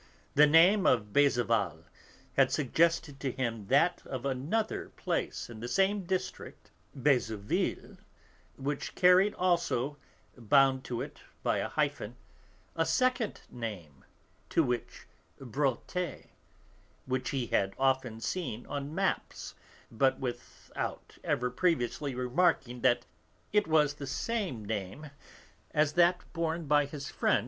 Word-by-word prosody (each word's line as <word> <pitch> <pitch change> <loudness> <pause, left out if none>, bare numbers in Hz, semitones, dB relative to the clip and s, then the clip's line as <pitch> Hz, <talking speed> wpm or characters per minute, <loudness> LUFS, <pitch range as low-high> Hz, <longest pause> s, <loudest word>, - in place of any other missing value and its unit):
The 150 +1 +7
name 180 +6 +6
of 105 -4 +2
Beuzeval 135 -6 +2 0.5
had - - +4
suggested 155 +1 +1
to 135 - -2
him 115 -5 -3
that 145 - +3
of 130 -1 -5
another 145 - -1
place - - -3
in 115 -2 -10
the 120 - -5
same 195 +7 +1
district, 185 +1 -4 0.2
Beuzeville, 120 -7 0 0.6
which 140 +1 -4
carried 185 +3 +5
also, 160 -6 0 0.4
bound 130 +2 +3
to 120 -2 -3
it - - -10 0.2
by - - +1
a - - -1
hyphen, - - -1 0.6
a 165 - +2
second 250 +7 0
name, 100 - -7 0.5
to 165 - +3
wit 125 -3 -3 0.3
Bréauté, 140 - -2 0.8
which 130 0 -2
he 135 -3 -1
had 95 -3 0
often 130 -4 +1
seen 120 -1 -3
on 145 +2 -5
maps, 195 +1 -2 0.4
but 130 +3 +2
without 120 -2 -6
ever 125 0 0
previously 140 -3 0
remarking 125 -1 +1
that 120 +1 +3 0.5
it 210 -4 +3
was 150 -2 +3
the 145 -1 -8
same 165 - -2
name 110 +8 -5 0.6
as 150 0 +3
that 175 +1 +4
borne 165 -1 -2
by 145 0 +3
his 140 -1 -7
friend - - +2
M. - - 0
140 Hz, 125 wpm, -30 LUFS, 120-170 Hz, 0.8 s, The